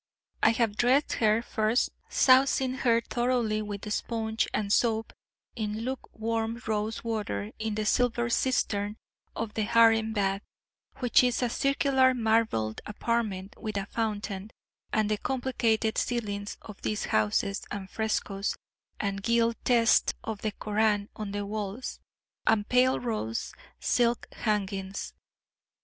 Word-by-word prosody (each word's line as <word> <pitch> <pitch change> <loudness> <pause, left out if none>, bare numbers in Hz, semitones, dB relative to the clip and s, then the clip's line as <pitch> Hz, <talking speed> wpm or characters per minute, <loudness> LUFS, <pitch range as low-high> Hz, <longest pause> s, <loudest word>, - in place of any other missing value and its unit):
I - - +6
have 225 -3 0
dressed 260 +4 +3
her, 220 +1 +3
first 220 +1 +1 0.2
sousing 260 0 +4
her 235 -3 +2
thoroughly 240 -3 0
with 210 0 -4
sponge 225 -1 -1
and 205 -1 0
soap 225 -2 +1 0.4
in 215 -1 -3
luke 260 +2 -4
warm 225 +1 -2
rose 215 0 -2
water 205 - -3
in 220 -1 -2
the 215 0 -1
silver 240 +1 +2
cistern 215 -4 0 0.4
of 220 -1 -3
the 220 - -1
harem 225 0 +4
bath, 195 -2 0 0.6
which 245 0 +5
is 250 0 +1
a 245 - +1
circular 265 0 +3
marbled 220 - +1
apartment 210 -3 -2
with 215 -2 -3
a 195 - -2
fountain 210 -2 -3 0.4
and 215 -1 +1
the 210 - 0
complicated 235 -4 0
ceilings 205 -4 -2
of 210 -2 -11
these 210 - -2
houses, 110 - +1
and 200 -2 -5
frescoes, 205 -1 -1 0.4
and 200 -1 -2
gilt 230 +1 +2
texts 235 -2 +4
of 220 -2 -5
the 215 - -1
Koran 210 0 0
on 210 -2 -5
the 205 0 -3
walls, 210 +3 -4 0.5
and 210 -1 +3
pale 255 +1 +4
rose 215 - -3 0.3
silk 240 -1 +1
hangings. 195 -3 -2
220 Hz, 130 wpm, -28 LUFS, 205-235 Hz, 0.6 s, I